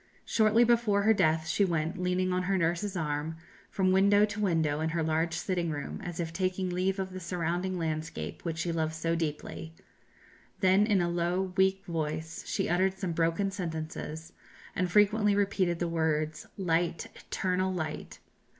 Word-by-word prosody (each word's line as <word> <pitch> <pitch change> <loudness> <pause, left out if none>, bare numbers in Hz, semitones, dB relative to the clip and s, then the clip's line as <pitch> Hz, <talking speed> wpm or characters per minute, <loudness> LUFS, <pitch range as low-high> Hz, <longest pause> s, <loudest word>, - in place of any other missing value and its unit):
Shortly 220 +1 +4
before 230 -4 +3
her 220 +1 +5
death, 160 -5 +2
she 165 +5 +2
went, 165 -3 0
leaning 180 0 +1
on 180 - +1
her 190 +1 +1
nurse's 175 +3 0
arm, 150 0 -2 0.3
from 190 -1 +1
window 200 +2 +5
to 210 0 -6
window 160 -7 +1
in 160 +1 0
her 165 0 -1
large 160 +1 0
sitting 175 -1 -1
room, 145 -2 -5
as 175 -1 -6
if 165 -1 -3
taking 185 +1 -1
leave 185 +2 0
of 190 -1 -4
the 185 - -5
surrounding 180 +1 -2
landscape 160 -1 -4
which 165 -2 -3
she 170 +1 -1
loved 160 -1 -1
so 165 +1 -1
deeply. 160 0 -4 0.8
Then 195 +1 +4
in 205 -4 +3
a 175 - +1
low 175 +2 -1
weak 190 +1 +2
voice 160 -1 -3
she - - -1
uttered 190 +2 +1
some 190 -3 -2
broken 165 +4 +1
sentences, 160 -2 -5 0.4
and 180 -1 0
frequently 210 +1 +4
repeated 195 -4 +1
the 175 - -1
words, 155 -2 -1
"Light, 170 -3 0
eternal 185 0 -1
light!" 155 -4 -4
175 Hz, 170 wpm, -30 LUFS, 160-190 Hz, 0.8 s, her